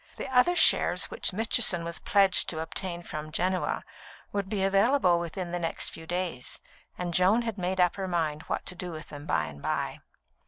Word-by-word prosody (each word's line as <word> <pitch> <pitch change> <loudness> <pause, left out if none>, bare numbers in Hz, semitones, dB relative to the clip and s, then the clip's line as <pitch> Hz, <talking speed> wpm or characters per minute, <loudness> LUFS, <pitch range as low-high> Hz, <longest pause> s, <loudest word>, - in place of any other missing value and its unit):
The - - -5
other 300 +9 +5
shares - - +4
which 485 - -2
Mitchison 215 -3 +4
was 170 0 -5
pledged 195 -2 +3
to 160 - -3
obtain 175 +2 -4
from 155 -1 -7
Genoa 185 +3 -1 0.5
would 200 -1 -3
be 200 -2 -1
available 195 -1 +3
within 170 +1 -5
the 175 - -2
next 165 -1 -1
few 160 0 -10
days, 175 -7 -3 0.4
and 175 -1 -3
Joan 195 +7 +3
had 225 -3 -4
made 185 +1 -2
up 180 +2 +3
her 190 -1 -3
mind 160 -4 -1
what - - -3
to - - -4
do 180 0 -6
with 155 0 -9
them 145 +1 -9
by 80 - +1
and 70 -1 -10
by. - - -2
180 Hz, 195 wpm, -28 LUFS, 165-195 Hz, 0.5 s, other